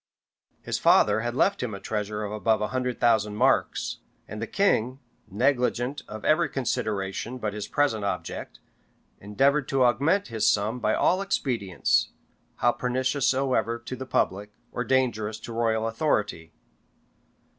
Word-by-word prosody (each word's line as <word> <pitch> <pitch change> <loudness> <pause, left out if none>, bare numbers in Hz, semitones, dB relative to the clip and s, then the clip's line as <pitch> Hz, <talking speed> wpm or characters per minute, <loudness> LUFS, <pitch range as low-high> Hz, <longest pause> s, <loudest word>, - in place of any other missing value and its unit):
His - - -2
father 105 +1 +4
had 120 +2 -3
left 200 +8 +2
him 115 -5 -3
a - - -8
treasure 105 0 -3
of 105 - -4
above 110 +1 +1
a 105 - -2
hundred 125 -1 -2
thousand 105 -3 +2
marks; - - +1 0.3
and 110 +1 -7
the 115 - -3
king, 130 - +1 0.3
negligent 125 +3 0
of 110 0 -8
every 160 +2 +3
consideration 110 -2 -2
but 110 -4 -3
his 105 -1 -5
present 140 -8 +1
object, 100 -2 -4 0.6
endeavored 135 +8 +1
to 135 -1 +2
augment 145 - +2
his 110 -2 +2
sum 105 +4 0
by 110 -2 +1
all 185 +2 +2
expedients, 120 - 0 0.5
how 120 - +3
pernicious 130 +2 -1
soever 130 -3 +1
ta 120 +2 -7
the 130 +1 -7
public, 105 -3 -1 0.2
or 125 - -2
dangerous 115 -5 0
to 115 - -7
royal 115 -1 0
authority. 105 - -1
115 Hz, 145 wpm, -26 LUFS, 105-130 Hz, 0.6 s, father